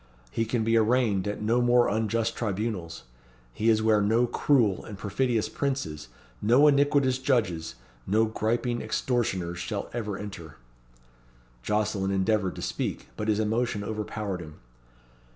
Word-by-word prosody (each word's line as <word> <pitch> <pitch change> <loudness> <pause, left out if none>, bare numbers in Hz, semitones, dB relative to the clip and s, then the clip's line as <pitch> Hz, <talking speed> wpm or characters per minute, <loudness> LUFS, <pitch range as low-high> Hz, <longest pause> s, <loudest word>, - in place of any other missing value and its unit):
He 115 - 0
can 115 0 -1
be 115 +1 +2
arraigned 110 -4 +2
at 105 +1 -3
no 115 +3 +2
more 120 0 +4
unjust 110 +1 0
tribunals. 100 -5 -3 0.5
He 110 +2 +1
is 110 -1 +3
where 110 -1 +4
no 115 +4 +3
cruel 120 -6 +2
and 105 - -9
perfidious 115 +3 0
princes, 85 - -3 0.3
no 125 +7 +5
iniquitous 140 -2 +3
judges, 110 - 0 0.3
no 110 +3 +3
griping 120 +2 -1
extortioners 95 -9 -1
shall 100 +4 -4
ever 105 -4 -3
enter." 90 -8 -8 1.0
Jocelyn 105 - 0
endeavoured 100 0 +1
to - - -6
speak, - - -3
but 105 - -4
his 105 -1 +2
emotion 110 -1 0
overpowered 105 -3 -4
him. 75 -2 -10
110 Hz, 135 wpm, -27 LUFS, 100-120 Hz, 1.0 s, no